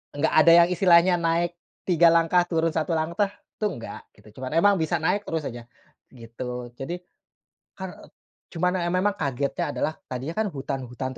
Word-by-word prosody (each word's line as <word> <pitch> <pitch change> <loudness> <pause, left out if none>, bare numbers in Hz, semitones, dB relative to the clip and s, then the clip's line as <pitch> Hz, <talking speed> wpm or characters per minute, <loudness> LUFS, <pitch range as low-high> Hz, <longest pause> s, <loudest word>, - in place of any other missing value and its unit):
enggak 150 +2 0
ada 155 +2 +6
yang - - +2
istilahnya 180 0 +5
naik 165 +1 +1 0.3
3 170 -2 +5
langkah, 165 +1 +4
turun 165 -1 0
1 160 +1 -1
langkah, 170 +6 0 0.3
tuh 210 -3 -1
enggak 115 - -8 0.2
gitu, 105 +3 -17
cuman 130 +5 -3
emang 205 +4 +5
bisa 165 +2 0
naik 180 +6 0
terus 160 -1 -2
aja, 120 -1 -7 0.4
gitu. 120 0 -7
Jadi, 170 +6 -5 0.8
kar 190 -1 -5
eee - - -16 0.4
cuman 180 +2 -1
emang 185 +3 +1
kagetnya 140 0 -2
adalah 155 - -1
tadinya 130 +4 -5
kan 220 - +1
hutan-hutan 130 -2 -5
165 Hz, 160 wpm, -25 LUFS, 135-175 Hz, 0.8 s, ada